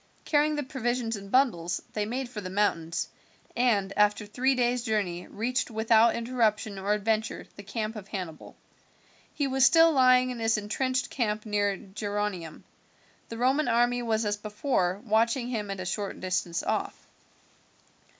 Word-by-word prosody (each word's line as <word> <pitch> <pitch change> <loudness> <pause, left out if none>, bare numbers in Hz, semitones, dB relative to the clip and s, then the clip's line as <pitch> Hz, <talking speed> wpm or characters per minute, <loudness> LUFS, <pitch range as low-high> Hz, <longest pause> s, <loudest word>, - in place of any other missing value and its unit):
Carrying 300 0 +2
the 295 - -2
provisions 245 -4 -2
in 200 -1 -9
bundles 180 -9 +2
they 210 -1 -1
made 255 +3 -3
for 235 -4 -7
the 185 - -6
mountains, 170 -4 0 0.5
and 210 -6 +2
after 210 0 +2
three 255 +6 +1
days' 245 0 +1
journey 205 -7 -2
reached 250 +4 -2
without 225 0 +4
interruption 225 -4 0
or 200 +2 +1
adventure 220 +1 -1
the - - -9
camp 215 +2 -4
of 205 -2 -8
Hannibal. 180 -6 -7 0.8
He 290 - 0
was 265 -1 +1
still 325 +4 +7
lying 255 -2 +5
in 245 - -6
his 225 -1 +2
intrenched 250 +5 -1
camp 215 -4 -1
near 205 -2 0
Geronium. 205 -4 -4 0.7
The 230 - -6
Roman 265 +5 +2
army 240 +1 +2
was 225 -2 0
as 205 0 0
before 210 -3 -1
watching 230 +3 +1
him 215 -4 -3
at 195 -1 -4
a 185 - -4
short 195 +2 -3
distance 180 -2 -2
off. - - -3
220 Hz, 155 wpm, -28 LUFS, 205-250 Hz, 0.8 s, still